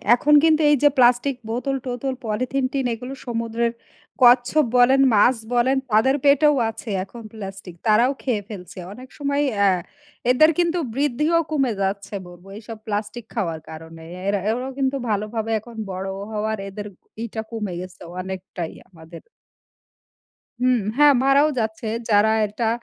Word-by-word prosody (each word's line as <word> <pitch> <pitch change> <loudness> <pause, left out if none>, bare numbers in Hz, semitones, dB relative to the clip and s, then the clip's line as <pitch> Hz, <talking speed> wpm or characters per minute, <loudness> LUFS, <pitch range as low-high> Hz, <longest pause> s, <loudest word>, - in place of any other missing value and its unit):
এখন 295 +4 +2
কিন্তু 320 -1 +4
এই - - +6
যে 290 - +7
প্লাস্টিক 250 +2 +4 0.2
বোতল 265 +4 -1
টোতল, 250 +2 -2
পলিথিন 255 +5 -1
টিন 270 -2 -1
এগুলো 250 +4 -7
সমুদ্রের 230 -1 -1 0.5
কচ্ছপ 245 +5 +5
বলেন, 260 +2 +5
মাছ 245 +5 +5 0.2
বলেন 255 +3 +3
তাদের 225 +6 +4
পেটেও 290 +1 +5
আছে 225 +1 -8
এখন 230 +5 -11
প্লাস্টিক। 195 -4 -8
তারাও 230 +4 +4
খেয়ে 235 -6 0
ফেলছে। 185 -3 -9
অনেক 255 +4 -11
সময়ই 285 0 0 0.2
আ - - +6 0.6
এদের 310 +6 +5
কিন্তু 345 0 +1 0.2
বৃদ্ধিও 295 +4 +1
কমে 270 -6 +1
যাচ্ছে 200 +1 -2
বলব 175 +1 -14
এইসব 225 +1 -9
প্লাস্টিক 210 +2 -4
খাওয়ার 170 -8 -2
কারণে। 160 +1 -10 0.2
এরা 200 0 +1
এরাও 250 +4 -2
কিন্তু 270 0 +1
ভালোভাবে 215 +2 -2
এখন 235 +2 -14 0.2
বড় 190 +1 -4 0.2
হওয়ার 215 0 -2
এদের 205 +1 -7 0.4
ইটা 220 -1 -5
কমে 210 -5 -4
গেছে 185 -1 -11 0.2
অনেকটাই 185 -2 -6 0.2
আমাদের। 165 -2 -13 1.4
হুম, 250 -1 +3 0.2
হ্যাঁ 295 0 +7
মারাও 275 +3 +4
যাচ্ছে। 220 0 -3 0.2
যারা 210 +1 +4 0.2
এটা 215 +2 -2
230 Hz, 145 wpm, -22 LUFS, 205-265 Hz, 1.4 s, যে